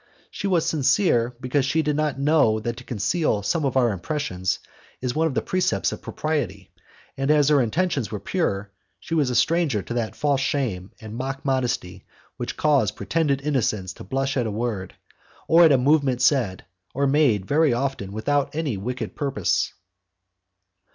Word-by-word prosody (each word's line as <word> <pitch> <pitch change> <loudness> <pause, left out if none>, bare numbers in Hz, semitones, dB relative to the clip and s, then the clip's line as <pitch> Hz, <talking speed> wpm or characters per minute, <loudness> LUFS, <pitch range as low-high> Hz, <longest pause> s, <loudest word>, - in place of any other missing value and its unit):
She 200 - -3
was 175 -4 +2
sincere, 140 - +2
because 130 +2 0
she 160 +4 +1
did 150 -1 0
not 150 -2 0
know 140 -6 +3
that 120 +2 -3
to 125 - -9
conceal 120 - 0
some 155 - 0
of 135 -1 0
our 120 -3 +3
impressions 95 - -2 0.4
is 125 -1 -2
one 160 +3 +2
of 140 - -4
the - - 0
precepts 185 0 0
of - - -7
propriety, 120 - -3 0.5
and 135 +1 -1
as 150 -1 +4
her 145 -2 +5
intentions 135 - 0
were 105 - -3
pure, 100 - -2 0.3
she 165 - -7
was 150 -5 +2
a 125 - -2
stranger 150 - +2
to 120 - -5
that 115 -4 -2
false 140 -2 +1
shame 120 - -2
and 110 0 -8
mock 135 +3 -4
modesty 125 -9 -1 0.3
which - - -5
cause 145 -9 +3
pretended 140 +3 0
innocence 110 -10 -1
to - - -11
blush 135 0 -1
at 120 -3 +1
a - - -1
word, 105 -3 -3 0.5
or 170 +1 +7
at 160 - +6
a 135 - +6
movement 135 -1 +2
said 120 -10 +2 0.3
or 140 +1 +1
made 135 -9 +3
very 150 +4 +3
often 120 -5 -2
without 140 +8 -1
any 150 -9 -1
wicked 125 +6 -4
purpose. 135 - 0
135 Hz, 175 wpm, -24 LUFS, 110-150 Hz, 0.5 s, or